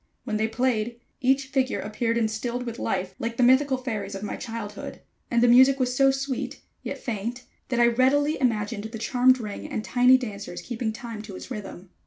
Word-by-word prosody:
When 215 - -2
they 220 +1 +1
played, 235 0 -1 0.2
each 270 +1 +2
figure 265 -1 0
appeared 230 +2 -1
instinct 235 +2 -1
with 235 0 -5
life, 185 0 -2
like 230 0 -3
the 250 - +3
mythical 260 +2 +4
fairies 215 -6 -4
of 195 - -6
my 210 - -3
childhood; 225 -3 -7 0.3
and 235 0 +2
the - - +6
music 260 +3 +6
was 250 -1 0
so 270 +1 +5
sweet, 270 -1 -2 0.2
yet - - -5
faint, 235 +2 -4 0.3
that 250 -2 0
I 240 - +6
readily 265 +5 +3
imagined 215 -3 0
the 225 +1 -6
charmed 255 +3 +3
ring 210 -3 -6
and 215 - -3
tiny 250 +3 +5
dancers 205 -7 -6
keeping 235 -2 -3
time 230 -2 -7
to 210 -3 -9
its 255 - -9
rhythm. 195 -5 -7
235 Hz, 195 wpm, -26 LUFS, 215-255 Hz, 0.3 s, the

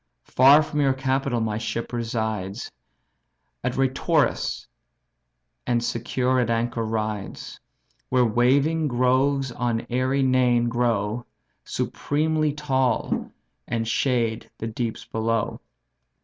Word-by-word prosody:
Far 140 +4 +6
from 150 -1 -2
your 135 -2 +3
capital 135 -2 0
my 110 -1 -1
ship 115 +1 -4
resides 110 -3 -3 0.9
At 125 0 -2
Reitorus, 135 +4 +1 1.0
and 120 -1 +1
secure 125 +2 0
at 120 -2 +1
anchor 115 0 0
rides; 110 -2 -4 0.5
Where 125 -1 +3
waving 140 +8 +2
groves 130 +1 +2
on 120 -1 -2
airy 130 +2 +1
Neign 125 -2 +3
grow, 115 -1 -1 0.4
Supremely 155 +1 0
tall 135 -4 0 0.4
and 115 -1 -2
shade 115 -2 0
the - - -5
deeps 115 0 -4
below. 115 +1 -1
125 Hz, 105 wpm, -24 LUFS, 115-135 Hz, 1.0 s, Far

